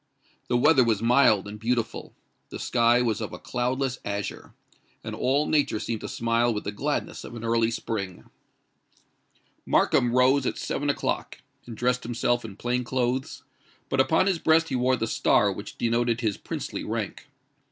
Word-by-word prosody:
The 120 - +2
weather 130 +1 +5
was 115 -4 +1
mild 115 -5 +4
and 105 +1 -8
beautiful; 115 0 -2 0.3
the - - -7
sky 120 0 +3
was 115 -2 -1
of 110 - -5
a - - -6
cloudless 125 +1 -2
azure; 100 0 -5 0.5
and - - -5
all 140 +4 +1
nature 145 -9 +1
seemed 115 -1 -3
to - - -5
smile 115 +1 +1
with 105 -2 -3
the - - -3
gladness 100 - -3
of 120 - -9
an 115 - -7
early 115 0 +2
spring. 100 -5 -4 1.4
Markham 120 - +2
rose 130 +1 +4
at - - -2
seven 145 +1 -2
o'clock, 145 - -2 0.3
and 115 -2 -8
dressed 125 +1 +1
himself 120 +1 0
in 105 -4 -8
plain 125 +3 -1
clothes; 130 +1 -2 0.5
but 135 - 0
upon 160 +7 +3
his 190 -4 +1
breast 160 +1 +3
he - - -1
wore 130 +1 +2
the 115 - -2
star 110 - +2
which - - -8
denoted 120 0 +1
his 110 -4 0
princely - - -5
rank. - - -4
120 Hz, 170 wpm, -26 LUFS, 115-130 Hz, 1.4 s, weather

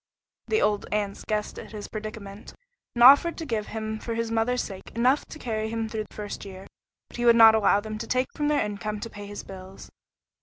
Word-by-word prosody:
The 435 - +2
old 210 -1 0
aunts 205 -1 -2
guessed 210 -1 -3
at - - -11
his 210 -1 -6
predicament, 215 -1 -8 0.4
and 240 - +3
offered 285 +6 +7
to 325 - -5
give 220 -6 -2
him 220 0 -4
for 230 +1 -4
his 230 0 -2
mother's 230 +2 +1
sake 190 -2 -9
enough 255 +5 +2
to - - -10
carry 220 -5 -3
him 225 0 -2
through 215 -1 -4
the - - -18
first 210 -1 -6
year, 190 -1 -10 0.4
but - - -11
he 240 - -1
would 235 -1 +7
not 225 -1 +9
allow 205 -2 +3
them 215 0 -6
to 230 - -5
take 255 0 0
from 295 - -1
their 295 -5 +2
income 210 +1 -4
to 230 - -6
pay 205 0 -9
his 205 0 -7
bills. 190 0 -11
220 Hz, 225 wpm, -26 LUFS, 205-235 Hz, 0.4 s, not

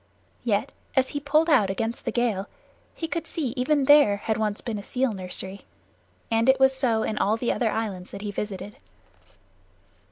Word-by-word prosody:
Yet 220 +1 0 0.2
as 265 -1 +3
he 290 - -3
pulled 300 +3 +2
out 255 - +4
against 225 +4 -3
the - - 0
gale 220 -5 0 0.5
he 325 - -4
could 330 -1 -3
see 300 -6 -2
that 250 +2 -6
even 285 +2 +2
there 290 -8 +6
had 220 +2 -1
once 215 -1 -1
been 220 -3 -4
a - - -8
seal 255 +3 0
nursery. 190 0 -6 0.7
And 225 +2 +3
it 265 0 +5
was 265 0 +5
so 235 -5 +1
in 215 - -2
all 215 +3 +2
the 240 +1 0
other 235 - 0
islands 200 -5 -3
that 200 +1 -8
he 205 - -3
visited. 205 0 -5
225 Hz, 190 wpm, -25 LUFS, 205-265 Hz, 0.7 s, there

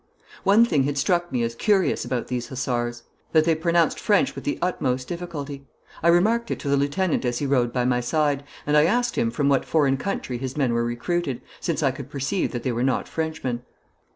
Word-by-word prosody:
One 205 +4 +6
thing 150 - +2
had 145 0 -2
struck 175 +3 +1
me 125 -2 0
as 115 0 -1
curious 190 - +2
about 125 -2 -2
these 125 -1 -3
hussars 120 -2 -2 0.3
that 155 -1 +5
they 165 - +4
pronounced 170 +1 +2
French 220 +6 +2
with - - -8
the 290 - -1
utmost 130 -8 -1
difficulty. 150 -6 -6 0.3
I 170 - +1
remarked 215 +7 +3
it - - -1
to 140 - -3
the 140 - +4
lieutenant 145 +6 0
as 120 -1 0
he 145 - -2
rode 125 -3 +2
by 125 0 0
my 125 -1 +2
side, 145 +2 0 0.2
and 150 - +1
I 150 +1 +6
asked 240 +7 +1
him 115 - +1
from 140 +5 0
what 140 -2 +3
foreign 140 -4 +2
country 130 -8 -3
his 130 +2 -5
men 130 -5 +1
were 120 0 +1
recruited, 135 +4 -2 0.2
since - - -1
I - - +3
could - - -9
perceive 140 +8 -1
that 120 -2 -4
they 130 - 0
were 120 0 -2
not 130 0 0
Frenchmen. 155 -7 -3
140 Hz, 215 wpm, -24 LUFS, 125-170 Hz, 0.3 s, One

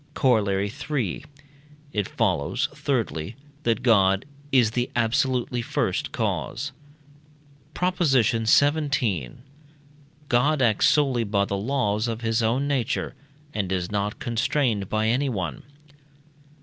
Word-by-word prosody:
Corollary 100 -5 +2 0.2
III. 130 - -1 0.7
It 105 -2 -1
follows, 125 - 0
thirdly, 120 - -2 0.3
that 115 -6 0
God 100 -4 +4 0.3
is 120 -5 +4
the 120 +2 -1
absolutely 120 +1 +1
first - - -1
cause. 140 +3 -2 1.0
PROP. 180 0 -1
XVII. 125 - +2 1.0
God 140 +5 +2
acts 115 -5 +3
solely 135 -5 +2
by 100 -2 +1
the 100 - -3
laws 110 0 0
of 115 0 -3
his 115 0 0
own 120 +5 +1
nature, 140 -2 -1 0.4
and 95 -3 -2
is 90 -1 -2
not 105 0 -1
constrained 120 -4 0
by 110 0 0
anyone. 110 - -1
115 Hz, 110 wpm, -25 LUFS, 105-135 Hz, 1.0 s, God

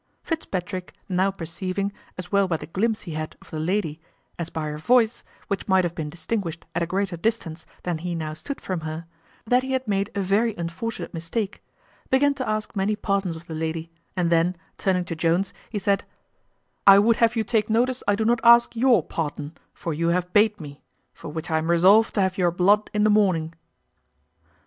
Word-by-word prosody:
Fitzpatrick, 185 - -4
now 190 0 +2
perceiving, 190 +2 -3 0.2
as 180 -1 -7
well 200 -1 +3
by 165 -3 0
the 150 - -8
glimpse 215 +7 -1
he 175 - -8
had 155 0 -5
of - - -18
the 155 - -4
lady, 165 -2 -1 0.4
as 170 -1 -3
by 160 - -4
her 150 0 -4
voice, 235 +5 +3 0.2
which 200 - -3
might 190 -2 +4
have 175 -1 -1
been 160 -4 -4
distinguished 170 +1 -4
at - - -1
a 170 - 0
greater 190 0 -1
distance 170 -4 -2 0.2
than 175 -3 -2
he 175 +1 -3
now 155 -2 -3
stood 275 - -6
from 185 -3 -3
her, 160 +1 -5 0.4
that 245 +3 +3
he 265 +1 -3
had 260 -2 -1
made 200 -1 0
a - - 0
very 205 +4 +1
unfortunate 175 +8 -5
mistake, 185 +5 -3 0.5
began 280 +2 +4
to 260 -4 -4
ask 215 0 -2
many 200 +2 +1
pardons 195 -4 -1
of 165 +1 -10
the 160 - -7
lady; 160 +1 -3 0.3
and 175 -2 +1
then, 170 +2 +3 0.2
turning 180 -2 +1
to 170 - -4
Jones, 170 +4 +1 0.2
he 215 - -4
said, 200 0 +1 0.8
"I 195 0 +10
would 225 +3 +4
have 230 0 +3
you 225 - +1
take 215 0 0
notice 245 +3 +1
I 205 - +4
do 220 +1 -1
not 235 +1 +2
ask 235 0 +6
your 235 -6 +4
pardon, 150 -1 -4 0.2
for 165 - -4
you 165 +3 0
have 180 +1 0
bate 210 0 +4
me; 145 -3 -10 0.3
for - - -9
which 160 +2 -5
I 160 - +3
am 160 +1 -3
resolved 190 +6 +5
to 205 - +3
have 190 0 0
your 175 -1 +4
blood 195 +5 +3
in 210 0 +1
the 215 - +5
morning." 180 -6 +2
185 Hz, 205 wpm, -24 LUFS, 165-215 Hz, 0.8 s, I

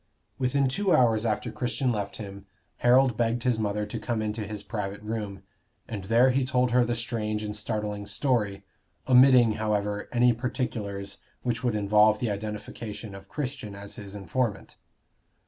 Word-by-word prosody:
Within 135 +1 +2
two 190 +7 +2
hours 115 -2 +3
after 105 -2 -1
Christian 125 +1 -1
left 100 -3 -3
him, 100 -2 -8 0.3
Harold 125 0 +4
begged 115 0 +1
his 125 -3 +1
mother 105 0 -1
to 110 +2 -5
come 115 0 -2
into 110 0 -2
his 105 0 -6
private 105 -2 -4
room, 105 -3 -4 0.4
and 105 -5 -5
there 120 +5 +5
he 135 +1 +2
told 125 -1 +1
her 125 0 +5
the 120 0 0
strange 110 -2 -2
and 105 0 -4
startling 105 -1 -3
story, 105 -3 0 0.4
omitting, 125 -2 +7
however, 105 -1 -1
any 120 0 +4
particulars 110 -5 -3 0.2
which 120 -1 -1
would 120 -3 +1
involve 105 +1 +4
the 115 -1 -1
identification 105 +1 -6
of 100 0 -11
Christian 130 -8 -4
as 100 0 -8
his 100 -1 -9
informant. 105 +4 -2
110 Hz, 160 wpm, -27 LUFS, 105-125 Hz, 0.4 s, omitting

